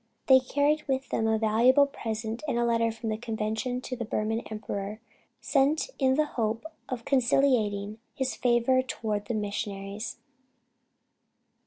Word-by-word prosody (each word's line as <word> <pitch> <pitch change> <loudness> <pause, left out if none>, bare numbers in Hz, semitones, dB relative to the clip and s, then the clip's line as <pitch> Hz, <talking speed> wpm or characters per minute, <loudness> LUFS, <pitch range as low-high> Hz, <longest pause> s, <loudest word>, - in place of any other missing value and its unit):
They 265 -1 +7
carried 285 +4 +1
with 265 0 -1
them 225 - 0
a 220 0 +3
valuable 235 +6 +5
present 225 -4 -4
and 235 - 0
a 240 - +2
letter 230 -1 +2
from 225 0 -5
the 215 - -1
Convention 225 +2 -2
to 255 - -5
the 240 - -4
Burman 215 0 -1
emperor, 210 -1 -5 0.4
sent 295 - +2
in 265 -2 +3
the 305 +2 +3
hope 225 -2 -2 0.2
of 245 -3 -4
conciliating 230 -6 +2 0.2
his 265 -1 -1
favor 245 +1 +3
toward 215 -5 -3
the 235 - -1
missionaries. 205 0 -4
230 Hz, 145 wpm, -28 LUFS, 215-260 Hz, 0.4 s, They